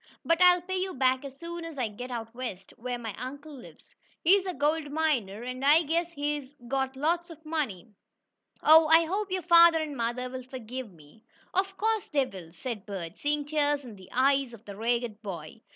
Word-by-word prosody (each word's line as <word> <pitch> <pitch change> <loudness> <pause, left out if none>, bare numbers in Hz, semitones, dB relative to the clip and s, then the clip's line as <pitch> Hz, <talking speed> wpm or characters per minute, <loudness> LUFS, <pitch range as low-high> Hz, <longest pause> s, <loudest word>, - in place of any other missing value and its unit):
But 335 +1 +2
I'll 360 0 +7
pay 375 +1 -3
you 375 0 -2
back 260 0 +2
as 275 -1 -9
soon 340 +1 -6
as 330 -3 -8
I 250 -3 0
get 245 +5 -8
out 230 -2 -5
west, 230 -7 -6
where 245 +1 -4
my 225 -3 -5
uncle 285 +5 -7
lives. 255 -3 -14 0.3
He's 385 +3 +5
a 365 - -2
gold 295 +1 0
miner, 250 -10 0
and 255 +1 -5
I 300 +4 +6
guess 335 +3 0
he's 290 -2 -2 0.2
got 265 0 -1
lots 340 +5 0
of 320 -1 -13
money. 295 - -2 0.8
Oh, 315 +1 +8
I 325 +1 +6
hope 395 +4 -2
your 370 -1 -1
father 335 0 +7
and 305 -2 -4
mother 240 +1 -2
will 255 0 -6
forgive 255 -2 -7
me." 160 +5 -19 0.3
"Of 390 +1 0
course 440 0 0
they 280 -3 +2
will," 185 -8 -10
said 220 +1 -6
Bert, 185 -3 -6
seeing 295 0 0
tears 290 -1 +1
in 230 -4 -9
the 190 -1 -15
eyes 270 0 +2
of 225 -1 -13
the 200 - -8
ragged 230 0 -1
boy. 185 -1 -7
275 Hz, 200 wpm, -28 LUFS, 235-320 Hz, 0.8 s, Oh